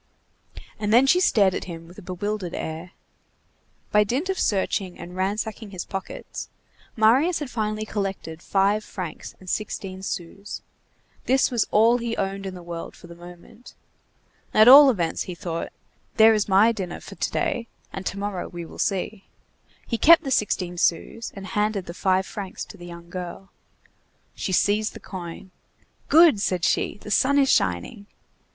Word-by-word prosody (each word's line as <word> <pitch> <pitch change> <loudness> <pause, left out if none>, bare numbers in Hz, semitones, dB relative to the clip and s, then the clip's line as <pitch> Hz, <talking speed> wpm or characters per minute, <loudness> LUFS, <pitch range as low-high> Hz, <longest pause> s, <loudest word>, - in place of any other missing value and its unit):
And 210 -1 -1
then 245 +4 +6
she 355 +7 +4
stared 200 - +4
at - - -4
him 165 -2 -8
with 180 +4 -13
a - - -11
bewildered 185 0 -4
air. 160 +3 -6 1.0
By 210 0 +5
dint 260 - -2
of 380 - -1
searching 190 -2 0
and 175 +1 -9
ransacking 210 +3 -3
his 185 -3 -6
pockets, 195 -1 -7 0.5
Marius 260 +11 +4
had 295 -5 -5
finally 215 -1 -2
collected 195 -6 -4
five 200 +3 +1
francs 180 -7 -7
sixteen 190 -1 -4
sous. 190 +2 -6 0.6
This 260 +1 +3
was 235 -3 +1
all 230 +3 +4
he 230 -1 -3
owned 195 0 -3
in 185 - -6
the 180 - -10
world 170 -1 -7
for - - -15
the 170 - -11
moment. 175 +7 -14 0.8
"At 215 +1 +7
all 280 +2 +11
events," 175 -10 -1
he 180 - -5
thought, 170 -1 -4 0.5
"there 225 0 +8
is 210 -1 0
my 200 +4 +5
dinner 190 -6 -5
for - - -11
to - - -2
day, 230 - -1 0.3
and 190 - -5
to 200 - -3
morrow 200 -2 -3
we 175 -1 -7
will - - -12
see." 195 +1 -2 0.6
He 230 - -2
kept 335 +2 +7
the 270 - -4
sixteen 180 -6 0
sous, 225 +8 0
and 195 -1 -8
handed 210 -1 -1
the 170 - -7
five 185 +1 +1
francs 195 -2 -6
to - - -12
the 175 -1 -10
young 170 0 -10
girl. 185 +2 -7 0.8
She 190 - -4
seized 210 +3 +1
the - - -8
coin. 180 0 -8 0.6
"Good!" 315 -9 +6
said 180 -4 0
she, - - 0
"the 210 - -7
sun 275 +7 +3
is 275 -1 +4
shining!" 90 - 0
200 Hz, 170 wpm, -24 LUFS, 180-220 Hz, 1.0 s, all